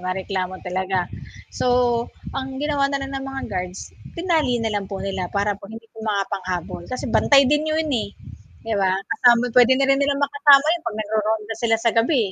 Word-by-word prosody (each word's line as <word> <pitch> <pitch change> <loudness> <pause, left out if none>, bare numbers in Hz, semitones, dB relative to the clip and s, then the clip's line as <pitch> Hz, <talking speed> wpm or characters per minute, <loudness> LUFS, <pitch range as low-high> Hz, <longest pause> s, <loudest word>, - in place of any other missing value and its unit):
mareklamo 185 0 -3
talaga. 185 +1 -1 0.6
So, - - 0 0.7
ang 265 0 -4
ginawa 295 -2 +1
na 280 - -1
lang 270 - -7
ng 270 0 -4
mga 270 0 -5
guards, 180 0 -4 0.4
tinali 325 -7 +1
na 225 -2 -2
lang 200 -1 -2
po 195 - -4
nila 195 -2 -3
para 205 +1 +1
po - - -14
hindi 225 +1 -10
po - - -16
makapanghabol, 190 -4 -3
kasi 255 - -4
bantay 280 -1 +6
din 300 +1 +1
'yun, 315 +1 0 0.2
eh, - - -8 0.6
'di 225 -1 -2
ba? 190 -1 +2 0.2
Kasama 245 -1 +3
puwede 250 0 +6
na 275 0 +2
rin 275 0 +3
nilang 280 0 +1
makasama 285 0 +5
'yon 345 -1 -3
'pag 220 -2 -4
nagro-ronda 215 0 -1
sila 225 -1 +3
sa 230 - +4
gabi, 240 +3 +3
230 Hz, 190 wpm, -22 LUFS, 195-275 Hz, 0.7 s, bantay